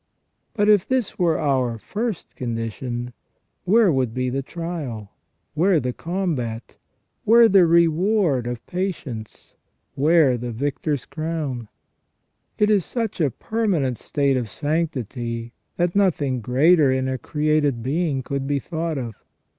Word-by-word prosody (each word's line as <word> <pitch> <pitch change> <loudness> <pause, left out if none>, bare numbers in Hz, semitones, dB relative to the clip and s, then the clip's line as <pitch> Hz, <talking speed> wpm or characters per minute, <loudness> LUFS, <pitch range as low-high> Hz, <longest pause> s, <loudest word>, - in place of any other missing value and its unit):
But 205 -2 +2
if 210 -3 +4
this 255 -5 -1
were 170 -3 +3
our 130 -5 +1
first 215 - -4
condition, 120 +1 -4 0.5
where 210 0 +5
would 130 -5 0
be 125 0 -1
the 135 +2 -1
trial? 145 - -6 0.4
Where 175 +2 +3
the 125 -1 -2
combat? 150 -12 -3 0.5
Where 230 +1 +7
the 190 -4 +5
reward 170 - +3
of 120 -1 -5
patience? 155 - -5 0.4
Where 145 -3 +3
the 120 0 -4
victor's 140 +2 -2
crown? 155 -7 -4 0.9
It 210 0 +3
is 200 -4 +3
such 230 -4 -3
a 150 - +3
permanent 165 - -1
state 140 -2 0
of 120 -4 -3
sanctity, 120 -5 -3 0.2
that 175 +1 0
nothing 145 -10 +1
greater 140 +5 +4
in 130 0 0
a 130 -1 -2
created 150 -5 0
being 140 0 -1
could 135 +1 -3
be 145 0 +1
thought 160 +2 -3
of. 120 -4 -4
145 Hz, 130 wpm, -23 LUFS, 125-175 Hz, 0.9 s, Where